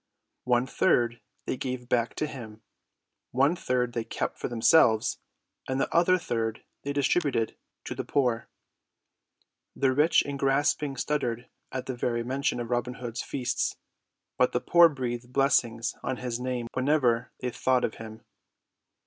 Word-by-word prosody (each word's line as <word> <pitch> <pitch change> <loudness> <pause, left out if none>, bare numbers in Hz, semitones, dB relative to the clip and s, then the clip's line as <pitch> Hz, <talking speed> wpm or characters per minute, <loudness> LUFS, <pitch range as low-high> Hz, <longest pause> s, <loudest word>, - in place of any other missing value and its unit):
One 125 0 +3
third 120 -2 +1 0.2
they - - -2
gave 125 -2 -4
back 120 -2 0
to - - -1
him; 110 -7 -9 0.7
one 140 +7 +3
third 125 -6 -1
they 115 - -1
kept - - -4
for - - -2
themselves; 115 -1 +4 0.5
and 130 0 0
the - - -1
other 175 +2 +5
third 115 -10 -2 0.2
they 140 - -3
distributed 140 -4 +1 0.3
to - - -5
the - - -4
poor. 125 -5 0 1.3
The 130 -1 +2
rich 150 +5 +4
and 140 -1 -5
grasping 140 +1 +1
shuddered 125 -3 -2 0.2
at 130 -1 -4
the 130 - -4
very 120 -1 -1
mention 135 +1 -1
of 120 0 -5
Robin 120 +1 -1
Hood's 120 -1 -5
feasts, 130 -3 -2 0.6
but 125 - +3
the 125 - +2
poor 170 +3 +6
breathed 125 -4 -4
blessings 120 -4 +2
on 130 - -2
his 125 -2 -3
name 125 -1 -2
whenever 130 -3 +2
they 125 - -2
thought 130 +1 +1
of - - -5
them. 110 0 -9
125 Hz, 150 wpm, -28 LUFS, 120-140 Hz, 1.3 s, poor